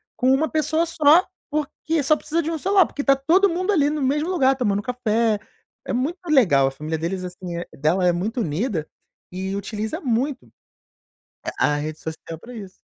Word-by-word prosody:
com 255 +1 +2
uma 290 +4 +2
pessoa 315 +1 +1
só, 325 +1 +5 0.2
porque 305 +1 -2
só 305 +3 +4
precisa 325 +3 -1
de 325 +1 -3
um 325 - -2
celular, 385 +2 +4
porque 285 - -5
tá 275 -1 +5
todo 340 +9 +3
mundo 365 +4 0
ali 295 -7 +3
no 300 0 -2
mesmo 295 +6 0
lugar 270 -7 +3
tomando 205 -6 0
café, 230 -2 0 0.5
é - - -3
muito 275 +9 -1
legal, 190 - +4
a - - -1
família 155 +4 -4
deles, 185 +4 -3
assim 180 -1 -6
dela 160 +6 +1
é 175 - +5
muito 210 +8 -2
unida, 170 - -2 0.4
e 190 +2 -4
utiliza 215 - -4
muito, 260 +1 -1 1.1
a 150 - +3
a - - 0
rede 155 +1 -4
social 160 0 -7
pra 240 +9 -12
isso. 195 -5 -9
250 Hz, 185 wpm, -22 LUFS, 185-305 Hz, 1.1 s, só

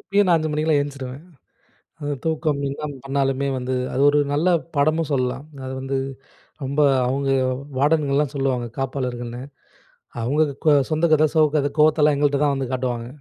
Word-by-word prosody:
இப்பயும் 205 0 +1
நான் 170 - +5
5 155 0 -2
மணிக்கெல்லாம் 150 -1 +2
எந்திருச்சுருவேன். 140 -1 -6 0.8
அது 145 0 -2
தூக்கம் 155 -2 0
என்ன 150 +2 -5 0.2
பண்ணாலுமே 135 0 0
வந்து 130 +1 -2 0.2
அது 135 - 0
ஒரு 145 0 +3
நல்ல 150 +5 +1 0.3
பாடமும் 155 +2 +1
சொல்லலாம். 130 +1 -1 0.2
அது 130 - -5
வந்து, 135 0 -2 0.7
ரொம்ப 140 +3 -2 0.3
அவுங்க 135 +2 -1 0.5
வார்டன்கள்லாம் 145 -1 +2
சொல்லுவாங்க, 130 -3 -1
காப்பாளர்கள்ன்னு. 125 -2 -3 0.8
அவுங்க 145 +7 +1 0.2
கொ 155 - +3 0.2
சொந்த 155 +2 +1
கதை, 155 0 +5
சோக 155 -1 +5
கதை, 145 -1 +1
கோவத்தலாம் 150 -1 +4
எங்கள்ட்ட 145 -1 +1
தான் 145 -1 +2
வந்து 130 -2 -3
காட்டுவாங்க. 125 -2 -2
140 Hz, 150 wpm, -22 LUFS, 130-150 Hz, 0.8 s, நான்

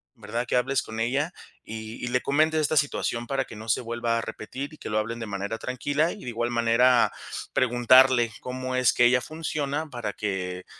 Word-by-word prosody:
¿verdad?, 115 +2 -4
que - - 0
hables 130 +1 +1
con 110 0 -7
ella, 140 +9 0 0.3
y 110 +2 -7
y - - -3
le 125 0 +1
comento 155 +3 +2
esta 155 +1 +1
situación 120 -5 0
para 135 +1 -1
que 115 - -11
no 110 +1 -9
se 115 - +2
vuelva 115 0 -1
a - - -2
repetir 135 +7 -6
y - - -12
que - - -7
lo 110 - +2
hablen 115 +2 -3
de 115 - -4
manera 100 +3 -3
tranquila 145 +7 0
y 210 - -9
de 125 - -5
igual 120 +1 -1
manera, 120 +1 +4 0.4
preguntarle 125 -1 +5
cómo 130 0 -4
es 130 -2 +4
que 120 - +4
ella 125 +1 +4
funciona 155 +1 -3
para 120 -6 -4
que 90 -3 -3
120 Hz, 205 wpm, -26 LUFS, 115-135 Hz, 0.4 s, preguntarle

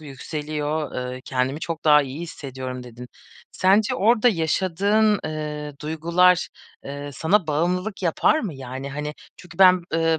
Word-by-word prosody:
yükseliyor, 150 +1 -4 0.2
eee, 130 - -8
kendimi 130 +3 -1
çok 165 -1 -5
daha 150 -1 +6
iyi 135 +3 -7
hissediyorum." 130 -6 -6
dedin. 125 0 -11 0.4
Sence 200 +3 +3
orada 230 +3 +4
yaşadığın, 200 +3 +2
eee, 150 -1 -4
duygular, 170 +3 +2 0.4
eee, 145 +1 -6
sana 175 +5 +1
bağımlılık 180 +7 -1
yapar 175 - +2
mı? 195 -9 -4
Yani, 135 +1 -7
hani, 150 +2 -5 0.2
çünkü 175 -1 -14
ben, 185 -2 +6
eee, 165 0 +2
155 Hz, 135 wpm, -23 LUFS, 145-180 Hz, 0.4 s, daha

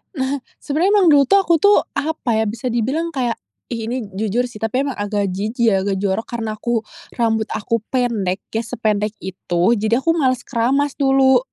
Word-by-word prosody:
Nah, 265 -1 -2 0.2
sebenarnya 330 +8 +1
emang 405 -4 +4
dulu 290 -3 +6
tuh 395 +9 +4
aku 370 -3 +2
tuh, 405 +6 +5 0.2
apa 285 -7 -1
ya. 220 - +2
Bisa 225 +4 -3
dibilang 265 +9 -1
kayak 245 -3 -1 0.3
ih 225 -2 -3
ini 250 +1 -2
jujur 220 +5 -1
sih, 215 - -11
tapi 225 +5 0
emang 275 -6 -4
agak 205 -2 -1
jijik 220 +5 0
ya, 195 - +2
agak 195 0 -1
jorok 195 +3 -1
karena 225 -2 -4
aku 235 -1 -1 0.3
rambut 225 -2 +1
aku 230 +2 -1
pendek 225 -7 -1
ya 225 - -1
sependek 215 -3 -1
itu, 175 -2 -2 0.2
jadi 230 +4 +1
aku 330 - +3
males 260 -6 +1
keramas 270 +4 +1
dulu. 270 -1 +4
235 Hz, 185 wpm, -19 LUFS, 215-270 Hz, 0.3 s, dulu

